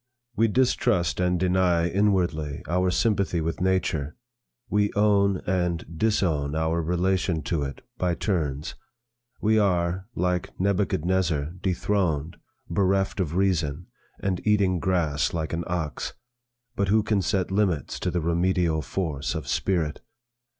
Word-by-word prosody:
'We 115 +2 +3
distrust 110 - +1
and 90 -1 +1
deny 90 -2 +2
inwardly 85 -7 0
our 90 +2 +1
sympathy 100 -2 +1
with 80 +2 -3
nature. 85 -6 0 0.5
We 105 0 +1
own 100 -2 +3
and 90 -2 0
disown 80 -8 +1
our 80 +1 0
relation 90 -1 0
to 80 +1 -1
it, 70 -1 -5 0.2
by 90 -2 +1
turns. 80 -7 -2 0.7
We 110 +1 +3
are, 90 -1 +1
like 90 0 -1
Nebuchadnezzar, 90 -5 +1
dethroned, 85 -4 0 0.3
bereft 95 0 +1
of 85 -3 -1
reason, 90 -5 0 0.3
and 95 -2 -1
eating 100 -4 +2
grass 85 -3 0
like 80 -1 -3
an 85 +1 -1
ox. 85 -4 -3 0.6
But 100 - 0
who 105 +2 +3
can 105 -2 +1
set 95 -1 0
limits 95 -6 0
to - - -1
the 90 - -1
remedial 85 -1 +1
force 75 -3 -3
of - - -5
spirit? 85 -6 0
90 Hz, 130 wpm, -25 LUFS, 80-95 Hz, 0.7 s, We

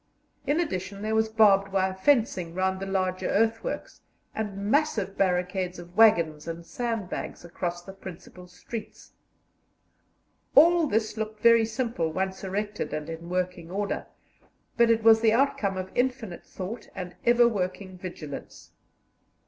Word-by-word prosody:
In 295 +3 +2
addition 200 - -3
there 215 +1 -1
was 220 0 +2
barbed 200 -3 +4
wire 190 -1 +1
fencing 190 -6 +1
round 190 0 0
the 195 - -5
larger 185 -1 -1
earthworks, 225 - -1 0.3
and 210 -3 -4
massive 205 -3 0
barricades 180 -1 0
of 175 +1 -11
waggons 170 -9 +4
and 165 0 -6
sandbags 225 -6 -4
across 175 0 -4
the 195 - -10
principal 185 -1 -11
streets. 210 +5 -9 1.4
All 335 +2 +7
this 220 -2 -1
looked 215 0 -4
very 230 -1 +6
simple 225 -8 -2
once 190 +3 -3
erected 205 +2 -3
and 155 +1 -4
in 165 +1 -8
working 180 -2 -2
order, 200 +2 -3 0.7
but 235 0 +4
it 225 -1 +3
was 225 0 +7
the 220 -1 +4
outcome 225 -6 +1
of 185 0 -5
infinite 245 -7 -2
thought 200 +5 -7
and 180 -2 -6
ever 240 0 +5
working 185 -3 -3
vigilance. 175 -5 -8
195 Hz, 140 wpm, -27 LUFS, 180-225 Hz, 1.4 s, All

